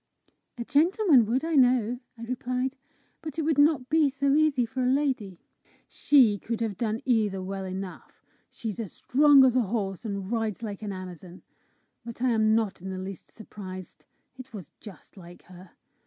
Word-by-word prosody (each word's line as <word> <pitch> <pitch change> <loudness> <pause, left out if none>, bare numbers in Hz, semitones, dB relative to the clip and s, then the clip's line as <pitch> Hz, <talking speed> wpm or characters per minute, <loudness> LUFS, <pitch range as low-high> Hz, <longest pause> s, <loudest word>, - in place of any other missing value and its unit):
"A 235 - -5
gentleman 315 - +4
would, 260 +7 0
I 330 - -2
know," 245 -3 +3 0.2
I 230 - -9
replied. 255 +2 -3 0.5
"But 310 -2 -7
it 320 - 0
would 305 -1 +1
not 290 -3 +3
be 310 -1 +3
so 275 +1 0
easy 295 -5 +3
for 255 +3 -5
a - - +1
lady!" 260 -9 -1 0.5
"She 240 -9 +3
could 230 +3 -4
have 225 -3 -2
done 220 +2 -3
either 215 -6 +1
well 190 +1 -5
enough. 190 0 -8 0.2
She's 225 -2 -6
as 215 -6 -5
strong 280 0 +5
as 255 -1 +2
a 255 - +4
horse 195 -3 -3
herself, - - -18 0.2
and 190 - -8
rides 225 -2 -2
like 205 -2 -6
an 210 -2 -4
Amazon. 185 -1 -9 0.6
But 235 0 -9
I 255 - +3
am 220 -1 +3
not 220 -5 -1
in 190 - -6
the 190 - -5
least 190 -1 -8
surprised: 185 -4 -10 0.3
it 255 -3 -11
was 185 -8 -9
just 200 -1 -14
like 175 -1 -13
her! 180 0 -15
230 Hz, 185 wpm, -27 LUFS, 195-265 Hz, 0.6 s, strong